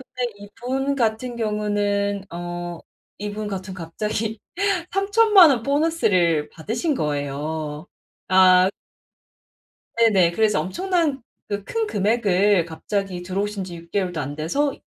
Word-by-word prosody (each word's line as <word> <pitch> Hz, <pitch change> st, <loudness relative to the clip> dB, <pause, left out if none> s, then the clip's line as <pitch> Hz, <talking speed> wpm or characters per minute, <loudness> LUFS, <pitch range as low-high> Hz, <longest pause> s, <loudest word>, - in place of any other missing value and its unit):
근데 245 Hz, -1 st, -1 dB
이분 250 Hz, +7 st, -3 dB
같은 235 Hz, 0 st, -1 dB
경우는 205 Hz, -2 st, -1 dB
어 175 Hz, 0 st, -5 dB, 0.4 s
이분 210 Hz, +1 st, -4 dB
같은 190 Hz, -1 st, -5 dB
갑자기 210 Hz, +5 st, -3 dB, 0.5 s
30,000,000 395 Hz, -2 st, +6 dB
원 245 Hz, -4 st, +2 dB
보너스를 210 Hz, -, +2 dB
받으신 230 Hz, -, -2 dB
거예요. 150 Hz, -, -3 dB, 0.4 s
아. 185 Hz, 0 st, +6 dB, 1.3 s
네네. 195 Hz, -7 st, +4 dB
그래서 210 Hz, -1 st, +2 dB
엄청난 330 Hz, -, -1 dB, 0.3 s
그 205 Hz, -1 st, -3 dB
큰 455 Hz, -, -1 dB
금액을 205 Hz, -, +2 dB
갑자기 180 Hz, +3 st, -3 dB
들어오신 200 Hz, +2 st, -2 dB
지 175 Hz, -2 st, -8 dB
6 170 Hz, 0 st, -13 dB
개월도 180 Hz, -4 st, -1 dB
안 145 Hz, +1 st, -5 dB
돼서 275 Hz, -, 0 dB
205 Hz, 225 characters per minute, -23 LUFS, 175-240 Hz, 1.3 s, 30,000,000